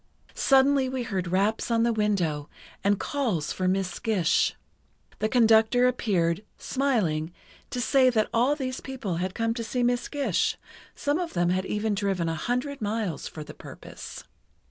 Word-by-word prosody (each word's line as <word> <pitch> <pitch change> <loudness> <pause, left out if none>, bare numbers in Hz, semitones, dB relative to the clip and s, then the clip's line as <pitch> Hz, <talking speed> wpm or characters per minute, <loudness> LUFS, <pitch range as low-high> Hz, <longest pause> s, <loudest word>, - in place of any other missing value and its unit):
Suddenly 270 -1 +4
we 260 -1 -2
heard 190 -6 -2
raps 200 +7 +1
on 230 -1 +2
the 235 0 +2
window 180 -9 0 0.3
and 200 0 +2
calls 225 - -1
for 185 - -1
Miss 185 -1 -1
Gish. 200 -8 +2 0.6
The 215 - 0
conductor 225 +1 +5
appeared, 190 -7 0
smiling, 200 - 0 0.4
to 250 - -4
say 255 +1 +4
that 220 -3 +2
all 250 +5 +3
these 260 -3 -4
people 235 -10 -4
had 185 +1 -3
come 230 0 0
to 230 0 -4
see 245 +2 -1
Miss 245 0 +1
Gish, 285 -1 0 0.4
some 290 +3 0
of 350 -2 -3
them 175 0 +1
had 185 +1 -1
even 210 +1 -1
driven 195 -4 0
a 165 - 0
hundred 250 - -2
miles 210 -6 -2
for 155 - -7
the - - -10
purpose. - - -10
220 Hz, 165 wpm, -27 LUFS, 185-250 Hz, 0.6 s, conductor